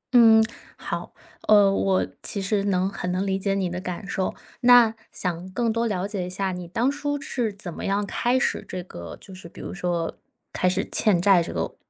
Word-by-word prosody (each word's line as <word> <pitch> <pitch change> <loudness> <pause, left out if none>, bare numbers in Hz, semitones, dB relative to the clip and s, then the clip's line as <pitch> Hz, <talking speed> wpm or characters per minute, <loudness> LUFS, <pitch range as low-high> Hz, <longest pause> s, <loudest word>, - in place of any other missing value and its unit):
嗯， 225 -2 +8 0.3
好。 - - -5 0.4
呃， 205 -2 +7
我 195 -1 +1
其 200 - -3
实 195 +1 0
能 190 -1 +1
很 180 -2 -3
能 185 +2 -1
理 190 0 +1
解 195 0 0
你 190 -2 0
的 180 +1 -4
感 185 +2 -5
受， 190 -1 -1 0.3
那 240 -2 +7 0.2
想 180 0 -3
更 230 +2 0
多 230 0 0
了 190 -2 -1
解 200 -4 -3
一 - - -6
下 190 +1 -2
你 180 -1 -6
当 235 +9 +1
初 290 0 -2
是 245 -5 -2
怎 195 -4 -7
么 - - -7
样 200 +1 0
开 245 +5 +1
始 - - 0
这 185 - -5
个 85 - -9
就 190 - -13
是 175 -2 -11
比 - - -14
如 - - -6
说， 175 -2 -2 0.4
开 185 - +2
始 185 +2 0
欠 200 -5 +3
债 190 -2 +5
这 - - -6
个 - - -3
195 Hz, 225 characters per minute, -24 LUFS, 180-220 Hz, 0.4 s, 嗯